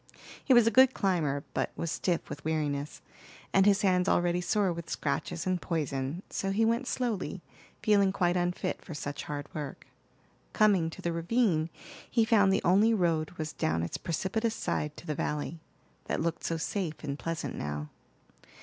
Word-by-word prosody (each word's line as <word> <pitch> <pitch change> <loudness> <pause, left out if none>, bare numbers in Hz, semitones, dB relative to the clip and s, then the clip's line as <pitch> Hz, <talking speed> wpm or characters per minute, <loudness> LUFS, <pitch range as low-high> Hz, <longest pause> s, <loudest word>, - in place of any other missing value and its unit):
He - - 0
was 240 -3 +7
a 230 - +4
good 260 +1 +6
climber, 155 -8 0
but - - 0
was 165 - -3
stiff 175 -1 -1
with 145 - -7
weariness, 150 -2 -2 0.5
and 195 +1 +5
his 205 +1 +4
hands 180 -1 +3
already 175 0 +2
sore 195 0 +1
with 170 0 -7
scratches 150 +3 -2
and 185 -2 0
poison; 150 0 -2
so 195 - -2
he 215 +3 +2
went 235 +3 +1
slowly, 215 -8 -2 0.4
feeling 200 -2 +4
quite 175 -2 +1
unfit 175 0 -1
for 160 - -8
such 145 -1 -5
hard 145 -1 -4
work. 145 -3 -6 0.7
Coming 195 -6 +4
to - - -10
the 170 - 0
ravine, 170 -2 +1 0.4
he 230 -2 +3
found 205 -4 +5
the 195 - +1
only 205 +6 +5
road 165 -5 +1
was 155 0 -4
down 80 +1 0
its 85 - -3
precipitous 220 +7 -1
side 150 0 -2
to - - -11
the 155 - -1
valley, 150 +3 -3 0.5
that - - -1
looked 165 +1 -2
so 165 - -1
safe 165 -1 -3
and 140 -1 -4
pleasant 165 -5 -3
now. 75 0 -4
175 Hz, 175 wpm, -30 LUFS, 155-200 Hz, 0.7 s, was